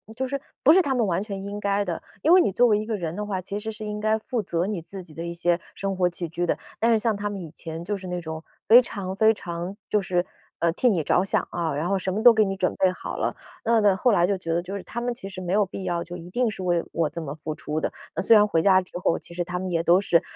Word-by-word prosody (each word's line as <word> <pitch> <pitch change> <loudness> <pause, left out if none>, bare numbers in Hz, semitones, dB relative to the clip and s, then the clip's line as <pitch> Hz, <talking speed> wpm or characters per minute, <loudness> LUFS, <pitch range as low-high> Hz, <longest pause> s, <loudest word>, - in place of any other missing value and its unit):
就 260 +1 -2
是 275 +1 -3 0.2
不 295 - +8
是 380 - +6
他 275 -5 0
们 240 -4 +2
完 185 +3 0
全 195 -2 -6
应 205 +1 -5
该 200 0 +1
的。 175 -4 -4 0.2
因 320 - +3
为 370 - +8
你 200 - +1
作 245 +5 +4
为 210 -3 +4
一 215 - -3
个 220 -1 -2
人 170 -1 -4
的 210 - -3
话， 195 -3 -2
其 195 +2 -5
实 220 +1 -4
是 215 - -9
应 210 0 -4
该 215 +1 +2
负 235 +1 -2
责 170 +1 -1
你 205 -4 -2
自 190 +3 -9
己 160 -3 -14
的 165 - -6
一 170 - -4
些 170 0 +1 0.2
生 195 -1 -2
活 180 - +3
起 170 0 -5
居 175 +2 -2
的。 - - 0 0.2
但 230 +1 +3
是 225 - +4
像 220 0 +1
他 205 +1 -3
们 200 - -5
以 165 - -7
前 160 +2 -7
就 205 +4 -2
是 190 - -10
那 180 0 -3
种 160 -1 -6 0.2
非 230 +3 +10
常 195 -6 -5
非 220 +2 +5
常 175 -1 -6
就 210 - +3
是， 180 -1 0 0.3
呃， 170 - +2
替 250 +6 +3
你 180 -6 +1
着 180 - +3
想 195 - 0
啊， 165 -4 -1
然 150 +4 -1
后 195 +1 +1
什 185 0 -2
么 210 - -1
都 240 0 +9
给 220 -1 +4
你 195 -1 -1
准 - - 0
备 185 -1 +3
好 - - -6
了。 - - -1 0.3
那 230 0 +3
那 205 -3 +4
后 240 +5 +3
来 175 -3 +4
就 200 - 0
觉 165 -3 -5
得 170 - +1
就 190 +3 -6
是 195 - -5
他 235 - -5
们 240 0 -1
其 195 -5 -8
实 190 -1 -8
没 180 0 -3
有 205 0 +4
必 190 0 -7
要 175 -2 -1
就 175 +1 -8
一 175 0 -10
定 240 +4 0
是 195 - -8
为 175 -2 +1
我 160 -3 0
这 170 +2 -6
么 140 -3 -5
付 155 0 -6
出 150 +1 -3
的。 - - -1 0.3
呃， - - 0
虽 225 +4 +6
然 210 -1 +7
回 165 -6 +1
家 190 +1 +5
之 180 - -15
后， 175 - +1
其 - - -8
实 175 - -3
他 180 +1 -3
们 185 +1 -3
也 165 -2 +1
都 175 +3 +5
是 170 -4 +3
190 Hz, 340 characters per minute, -25 LUFS, 175-210 Hz, 0.3 s, 非